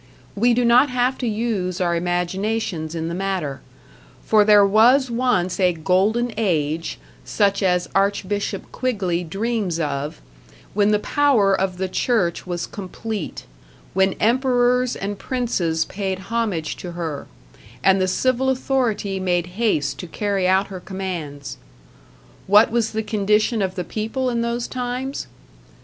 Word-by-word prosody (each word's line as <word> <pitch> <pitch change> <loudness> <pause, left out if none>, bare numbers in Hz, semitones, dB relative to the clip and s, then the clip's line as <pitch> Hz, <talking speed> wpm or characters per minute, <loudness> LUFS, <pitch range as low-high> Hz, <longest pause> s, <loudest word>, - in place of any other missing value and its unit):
We 235 +3 +3
do 245 0 +2
not 245 +4 +5
have 250 +1 0
to 250 - -2
use 210 -5 -1
our 175 -2 +1
imaginations 175 0 -2
in 165 0 -3
the 170 - -3
matter, 180 -7 -3 0.6
for 215 -1 +5
there 205 -1 +6
was 240 +6 +4
once 230 -8 0
a 180 -2 +3
Golden 195 +8 +1
Age 165 -6 -1 0.3
such 200 - +1
as 180 -2 +1
Archbishop 200 +1 -1
Quigley 190 -9 -1
dreams 195 0 -2
of, 145 0 -3 0.5
when 205 0 +3
the 210 - +4
power 225 -4 +2
of 190 -1 0
the 190 +1 -1
church 185 -3 0
was 175 -1 -3
complete, 205 -1 -6 0.5
when 190 0 +3
emperors 250 +1 +2
and 200 0 -4
princes 180 -11 -1
paid 190 -1 -3 0.2
homage 205 -9 -1
to 175 -1 -7
her, 165 -4 -5 0.6
and 190 0 +4
the 185 - +2
civil 255 +7 +1
authority 245 -7 0
made 175 -2 0 0.2
haste 145 -11 +1
to 180 - -6
carry 195 +1 -1
out 190 +2 +2
her 190 -2 -6
commands. 175 -7 -6 0.9
What 210 +3 +6
was 230 -1 0
the 220 0 -1
condition 210 +2 +1
of 190 -1 -1
the 180 - -2
people 225 +7 -2
in 235 -1 -1
those 235 +1 -2
times? 255 +2 -4
200 Hz, 140 wpm, -22 LUFS, 180-235 Hz, 0.9 s, there